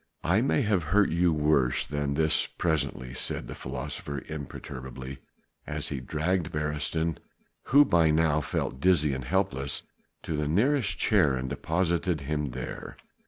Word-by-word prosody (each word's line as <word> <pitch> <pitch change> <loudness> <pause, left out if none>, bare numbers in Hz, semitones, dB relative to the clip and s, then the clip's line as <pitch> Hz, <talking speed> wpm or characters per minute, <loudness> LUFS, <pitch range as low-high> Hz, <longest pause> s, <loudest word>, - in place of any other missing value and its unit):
"I 95 +7 +3
may 135 +1 +2
have 105 -4 +2
to 80 - -8
hurt 100 +1 +3
you 85 +1 +3
worse 75 -5 +2
than 70 -1 -2
this 80 0 +2
presently," 70 -6 -1
said 65 - -3
the - - -6
philosopher 70 0 -5
imperturbably 65 -3 -7 0.5
as - - -3
he 70 - -3
dragged 80 +6 -1
Beresteyn 75 +2 -1 0.5
who 145 +4 +6
by 85 - +4
now 75 -1 +3
felt 65 -1 -3
dizzy 75 -3 +3
and 65 -1 -4
helpless 70 -5 0 0.4
to 80 - -3
the 75 0 -1
nearest 110 - +2
chair 70 -3 +3
and 65 +1 -3
deposited 85 +2 0
him 75 0 -2
there. - - -7
75 Hz, 150 wpm, -28 LUFS, 70-85 Hz, 0.5 s, who